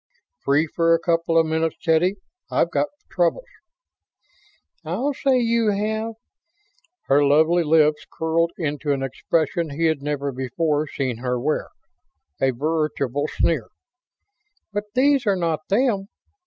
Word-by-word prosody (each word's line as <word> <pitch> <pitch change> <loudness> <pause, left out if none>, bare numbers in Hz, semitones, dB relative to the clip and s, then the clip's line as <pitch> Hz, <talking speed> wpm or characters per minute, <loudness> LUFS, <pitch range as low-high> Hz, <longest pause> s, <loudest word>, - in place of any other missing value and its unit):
"Free 145 +3 +2
for 165 +1 +2
a - - -1
couple 165 -1 +1
of 165 - +5
minutes, 160 0 0
Teddy? 175 +3 +2 0.3
I've - - +1
got - - +1 0.2
troubles." 180 - +1 1.4
"I'll 215 - -1
say 270 -1 +2
you 230 -2 +2
have." 220 +2 -1 0.9
Her 140 +2 +3
lovely 160 +5 +4
lips 155 -1 +3
curled 165 +1 0
into 150 -3 -1
an 135 -1 -2
expression 160 +4 -1
he 155 +4 -1
had 160 -3 +1
never 140 -1 -2
before 145 +4 -1
seen 130 -5 -3
her 125 +1 -2
wear 150 +5 -1 0.7
a 135 - +4
veritable 145 0 -1
sneer. 155 -8 0 1.1
"But 205 +1 -2
these 270 -2 +3
are 200 - +4
not 165 -3 -2
them." 200 -2 +1
160 Hz, 130 wpm, -22 LUFS, 145-190 Hz, 1.4 s, of